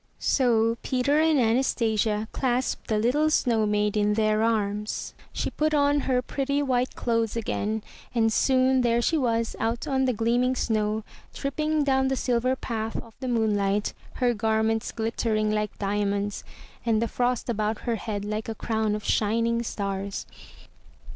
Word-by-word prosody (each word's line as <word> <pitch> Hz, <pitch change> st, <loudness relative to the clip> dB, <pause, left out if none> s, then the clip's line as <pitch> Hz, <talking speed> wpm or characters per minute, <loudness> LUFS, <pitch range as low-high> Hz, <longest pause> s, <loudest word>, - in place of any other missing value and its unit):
So 230 Hz, -3 st, +2 dB
Peter 275 Hz, +3 st, +1 dB
and 315 Hz, -2 st, +4 dB
Anastasia 225 Hz, -3 st, +1 dB
clasped 255 Hz, -1 st, -1 dB
the 215 Hz, -, +1 dB
little 265 Hz, +8 st, +2 dB
snow 230 Hz, -8 st, +2 dB
maid 210 Hz, 0 st, +1 dB
in 210 Hz, 0 st, +2 dB
their 215 Hz, 0 st, +2 dB
arms; 210 Hz, -2 st, -1 dB, 0.2 s
she -, -, -3 dB
put 310 Hz, 0 st, 0 dB
on 285 Hz, 0 st, +3 dB
her 255 Hz, -2 st, 0 dB
pretty 280 Hz, +2 st, -1 dB
white 255 Hz, -2 st, 0 dB
clothes 230 Hz, -2 st, 0 dB
again, 220 Hz, -1 st, -2 dB, 0.3 s
and 225 Hz, -1 st, +3 dB
soon 260 Hz, +1 st, +3 dB
there 235 Hz, -1 st, +2 dB
she 280 Hz, +7 st, +1 dB
was 230 Hz, -5 st, 0 dB
out 230 Hz, +4 st, -1 dB
on 265 Hz, -2 st, +1 dB
the 255 Hz, -, +2 dB
gleaming 240 Hz, +3 st, +1 dB
snow, 215 Hz, -2 st, 0 dB, 0.3 s
tripping 305 Hz, +2 st, 0 dB
down 265 Hz, -1 st, +2 dB
the 265 Hz, -, +1 dB
silver 250 Hz, 0 st, +1 dB
path 225 Hz, -3 st, -4 dB
of 230 Hz, -, -6 dB
the 260 Hz, -, -4 dB
moonlight, 210 Hz, -4 st, +1 dB, 0.2 s
her 245 Hz, -2 st, +2 dB
garments 220 Hz, +1 st, 0 dB
glittering 220 Hz, -1 st, 0 dB
like 210 Hz, -1 st, -2 dB
diamonds, 205 Hz, 0 st, -1 dB, 0.4 s
and 225 Hz, -2 st, +2 dB
the 230 Hz, -, 0 dB
frost 245 Hz, +1 st, -1 dB
about 215 Hz, -2 st, -1 dB
her 235 Hz, -2 st, -1 dB
head 205 Hz, -1 st, -4 dB
like 215 Hz, +2 st, -3 dB
a 225 Hz, -, -3 dB
crown 220 Hz, -2 st, -1 dB
of 210 Hz, -, -5 dB
shining 230 Hz, +2 st, +1 dB
stars. 200 Hz, -3 st, -3 dB
230 Hz, 155 wpm, -26 LUFS, 215-255 Hz, 0.4 s, and